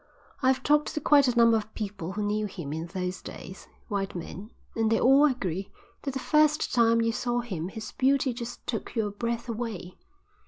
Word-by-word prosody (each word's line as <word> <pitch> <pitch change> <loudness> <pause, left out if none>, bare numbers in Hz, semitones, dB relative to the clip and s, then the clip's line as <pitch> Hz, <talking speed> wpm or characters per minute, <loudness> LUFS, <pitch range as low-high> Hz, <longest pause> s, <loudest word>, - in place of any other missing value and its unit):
I've 260 0 +2
talked 295 +1 +2
to - - 0
quite 285 -2 +5
a 245 - +1
number 230 -1 +6
of 220 0 -6
people 195 -4 -5
who 210 +1 -2
knew 210 +1 0
him 170 -7 -6
in 160 +2 -4
those 180 0 -4
days, 190 - -10 0.2
white 200 -2 -2
men, 185 +4 -7 0.3
and 225 -1 +1
they 225 - +3
all 270 +4 +6
agree 195 - -1 0.3
that 275 -2 -4
the - - -1
first 305 +2 +2
time 230 -1 +4
you 230 0 +2
saw 240 0 -1
him 185 -8 -4
his 215 +3 -7
beauty 265 -1 +2
just 240 0 -7
took 225 - -4
your 215 -3 0
breath 235 +3 -3
away. 225 -6 -5
230 Hz, 195 wpm, -27 LUFS, 200-255 Hz, 0.3 s, number